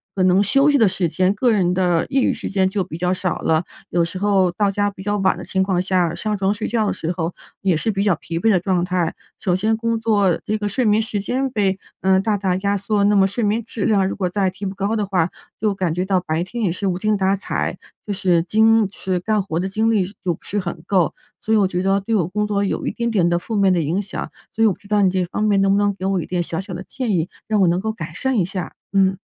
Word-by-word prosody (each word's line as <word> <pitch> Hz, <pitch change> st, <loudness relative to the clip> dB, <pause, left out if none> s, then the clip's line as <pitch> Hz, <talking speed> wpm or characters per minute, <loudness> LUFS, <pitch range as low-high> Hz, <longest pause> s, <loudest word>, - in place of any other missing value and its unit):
可 190 Hz, -, -1 dB
能 185 Hz, +2 st, +4 dB
休 275 Hz, +8 st, +4 dB
息 285 Hz, -, +4 dB
的 225 Hz, -4 st, +5 dB
时 180 Hz, -3 st, 0 dB
间、 185 Hz, +3 st, +1 dB
个 240 Hz, +3 st, +2 dB
人 180 Hz, -4 st, +2 dB
的 180 Hz, -3 st, +1 dB
业 270 Hz, -1 st, +2 dB
余 -, -, +2 dB
时 -, -, -5 dB
间 190 Hz, -1 st, +1 dB
就 195 Hz, -1 st, -1 dB
比 160 Hz, -, -7 dB
较 180 Hz, 0 st, +1 dB
少 185 Hz, 0 st, -1 dB
了。 160 Hz, +1 st, +1 dB, 0.3 s
有 170 Hz, -1 st, +2 dB
时 185 Hz, +2 st, -6 dB
候 195 Hz, -3 st, +3 dB
到 205 Hz, +2 st, +1 dB
家 205 Hz, +1 st, 0 dB
比 190 Hz, -, -12 dB
较 205 Hz, +1 st, -1 dB
晚 190 Hz, -1 st, +2 dB
的 -, -, -7 dB
情 190 Hz, 0 st, 0 dB
况 185 Hz, -2 st, +1 dB
下， 180 Hz, -3 st, +1 dB
上 210 Hz, +4 st, -2 dB
床 195 Hz, +1 st, +1 dB
睡 210 Hz, -, -4 dB
觉 225 Hz, -2 st, 0 dB
的 -, -, 0 dB
时 165 Hz, -, -3 dB
候 175 Hz, -1 st, -3 dB, 0.3 s
也 190 Hz, -4 st, +2 dB
是 220 Hz, +8 st, -1 dB
比 195 Hz, 0 st, -1 dB
较 195 Hz, -5 st, +3 dB
疲 165 Hz, +2 st, -6 dB
惫 220 Hz, +6 st, +3 dB
的 185 Hz, -, +4 dB
状 180 Hz, -1 st, 0 dB
态。 180 Hz, -3 st, -1 dB, 0.2 s
首 180 Hz, -3 st, +1 dB
先 220 Hz, +4 st, +1 dB
工 230 Hz, 0 st, -1 dB
作 205 Hz, -6 st, +2 dB
这 215 Hz, -, 0 dB
个 205 Hz, -1 st, -2 dB
睡 245 Hz, +5 st, 0 dB
眠 210 Hz, +1 st, +4 dB
时 215 Hz, -2 st, -2 dB
间 260 Hz, +6 st, -1 dB
被， 195 Hz, -5 st, 0 dB, 0.2 s
呃， 190 Hz, 0 st, +4 dB
大 210 Hz, +1 st, 0 dB
大 190 Hz, -2 st, 0 dB
压 200 Hz, +1 st, 0 dB
缩， 200 Hz, +1 st, 0 dB
那 205 Hz, 0 st, +4 dB
么 195 Hz, -1 st, +5 dB
睡 225 Hz, +4 st, -3 dB
眠 215 Hz, +3 st, +1 dB
质 225 Hz, -2 st, -4 dB
量 195 Hz, -3 st, +3 dB
如 -, -, -3 dB
果 185 Hz, -3 st, -1 dB
再 190 Hz, -1 st, 0 dB
提 195 Hz, +1 st, -6 dB
不 190 Hz, -, -5 dB
高 200 Hz, +3 st, -1 dB
的 210 Hz, -, 0 dB
话， 185 Hz, -3 st, +1 dB, 0.3 s
就 210 Hz, -1 st, +1 dB
感 180 Hz, -4 st, -1 dB
觉 180 Hz, +1 st, -1 dB
到 190 Hz, -1 st, +2 dB
白 160 Hz, -1 st, -2 dB
天 230 Hz, +5 st, -5 dB
也 180 Hz, -, +2 dB
是 195 Hz, +3 st, -4 dB
无 180 Hz, -1 st, 0 dB
精 215 Hz, 0 st, +1 dB
打 190 Hz, +1 st, +2 dB
采， 195 Hz, -, -3 dB, 0.3 s
就 205 Hz, -, -2 dB
是 180 Hz, -4 st, +2 dB
精 220 Hz, +1 st, +4 dB
就 200 Hz, -, -17 dB
是 185 Hz, -1 st, -1 dB
干 215 Hz, +3 st, 0 dB
活 170 Hz, -4 st, -3 dB
的 190 Hz, -, -1 dB
精 220 Hz, +3 st, 0 dB
力 205 Hz, -5 st, +2 dB, 0.2 s
就 175 Hz, -3 st, 0 dB
不 -, -, -25 dB
是 205 Hz, -, -2 dB
很 170 Hz, -3 st, -5 dB
够。 185 Hz, -5 st, +1 dB, 0.3 s
所 220 Hz, -, 0 dB
以 -, -, +5 dB
我 195 Hz, -2 st, +3 dB
觉 180 Hz, -1 st, -2 dB
得 195 Hz, +1 st, +2 dB
对 220 Hz, +3 st, -1 dB
我 175 Hz, -5 st, +1 dB
工 210 Hz, +3 st, -1 dB
作 200 Hz, -1 st, 0 dB
有 195 Hz, -, -2 dB
一 -, -, 0 dB
点 235 Hz, 0 st, -2 dB
点 190 Hz, -6 st, +2 dB
的 175 Hz, 0 st, +1 dB
负 220 Hz, +5 st, -5 dB
面 195 Hz, -2 st, +4 dB
的 170 Hz, -, +1 dB
影 165 Hz, +6 st, 0 dB
响， 200 Hz, -1 st, -5 dB, 0.2 s
所 225 Hz, -, +2 dB
以 -, -, +6 dB
我 200 Hz, -, +2 dB
不 -, -, -15 dB
知 200 Hz, -, -17 dB
道 210 Hz, -1 st, +2 dB
你 190 Hz, -, +4 dB
这 185 Hz, -1 st, 0 dB
方 205 Hz, +4 st, -3 dB
面 205 Hz, -2 st, +3 dB
能 195 Hz, 0 st, +3 dB
不 -, -, +3 dB
能 205 Hz, -1 st, +1 dB
给 190 Hz, -, -6 dB
我 190 Hz, -2 st, +1 dB
一 -, -, -5 dB
点 180 Hz, -1 st, -1 dB
小 165 Hz, +2 st, -3 dB
小 190 Hz, -1 st, -8 dB
的 180 Hz, -, -6 dB
建 235 Hz, +4 st, -3 dB
议？ 170 Hz, 0 st, 0 dB, 0.2 s
让 215 Hz, -2 st, +1 dB
我 185 Hz, -, +5 dB
能 175 Hz, +2 st, +2 dB
够 220 Hz, +2 st, -1 dB
改 170 Hz, -7 st, -7 dB
善 265 Hz, +4 st, -1 dB
一 180 Hz, -, +2 dB
下， 185 Hz, -3 st, -5 dB, 0.2 s
嗯。 190 Hz, -1 st, +3 dB
195 Hz, 315 characters per minute, -20 LUFS, 180-210 Hz, 0.3 s, 以